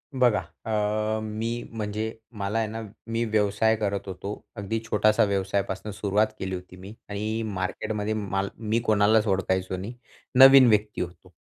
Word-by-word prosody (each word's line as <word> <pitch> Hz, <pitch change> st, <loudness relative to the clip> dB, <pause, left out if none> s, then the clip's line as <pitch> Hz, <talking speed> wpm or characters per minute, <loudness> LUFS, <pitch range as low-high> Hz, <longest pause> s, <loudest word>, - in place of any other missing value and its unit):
बघा. 120 Hz, -5 st, +4 dB, 0.3 s
अ, 110 Hz, 0 st, 0 dB
मी 115 Hz, +2 st, -3 dB
म्हणजे 110 Hz, 0 st, -3 dB, 0.3 s
मला 100 Hz, +3 st, -1 dB
आहे 110 Hz, -, 0 dB
ना 115 Hz, +1 st, -5 dB, 0.3 s
मी 115 Hz, +1 st, -1 dB
व्यवसाय 110 Hz, 0 st, +2 dB
करत 100 Hz, -2 st, -2 dB
होतो. 95 Hz, +2 st, -5 dB, 0.2 s
अगदी 105 Hz, +1 st, -2 dB
छोटासा 105 Hz, 0 st, +3 dB
व्यवसायापासनं 100 Hz, 0 st, -1 dB
सुरुवात 105 Hz, +1 st, +1 dB
केली 95 Hz, 0 st, -3 dB
होती 90 Hz, 0 st, -10 dB
मी 95 Hz, +3 st, -10 dB, 0.2 s
आणि 110 Hz, +2 st, -2 dB
मार्केटमध्ये 105 Hz, +2 st, -2 dB
माल 100 Hz, -2 st, -2 dB
मी 110 Hz, +1 st, 0 dB
कोणालाच 105 Hz, +1 st, +4 dB
ओळखायचो 95 Hz, -1 st, 0 dB
नाही, 100 Hz, +6 st, -6 dB, 0.4 s
नवीन 135 Hz, -1 st, +9 dB
व्यक्ती 105 Hz, -1 st, +1 dB
होतो. 90 Hz, -1 st, -7 dB
105 Hz, 145 wpm, -26 LUFS, 100-110 Hz, 0.4 s, नवीन